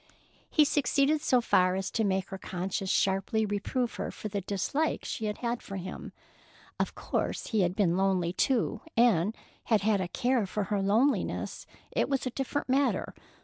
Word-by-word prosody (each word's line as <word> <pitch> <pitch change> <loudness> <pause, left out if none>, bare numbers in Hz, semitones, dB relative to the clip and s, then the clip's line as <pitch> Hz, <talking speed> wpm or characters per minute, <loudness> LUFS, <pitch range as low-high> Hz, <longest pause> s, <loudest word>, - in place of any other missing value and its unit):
He 305 - +5
succeeded 290 +1 +2
so 250 -5 +3
far 185 -5 +3
as 190 0 -3
to 225 - 0
make 190 -2 0
her 190 -1 -6
conscience 185 +1 -3
sharply 195 +4 +1
reprove 215 +4 -1
her - - -3
for 215 - -6
the 200 0 -2
dislike 205 - -1
she 220 - -3
had 235 +3 -2
for 195 - -8
him. 185 -1 -6 0.7
Of - - -1
course - - -2
if - - -9
he 220 -3 +3
had 180 0 +1
been 185 -5 +2
lonely, 185 -3 +1
too, 255 +3 +1 0.2
and 225 -4 +4 0.3
had 220 -4 +3
had 205 -1 +2
a 185 - -2
care 240 +3 +1
for 210 +2 -2
her 200 - +1
loneliness, 225 +9 +1 0.2
it - - 0
was 275 -2 0
a 255 - -2
different 270 +3 -3
matter. 270 +2 +1
210 Hz, 180 wpm, -29 LUFS, 190-250 Hz, 0.7 s, He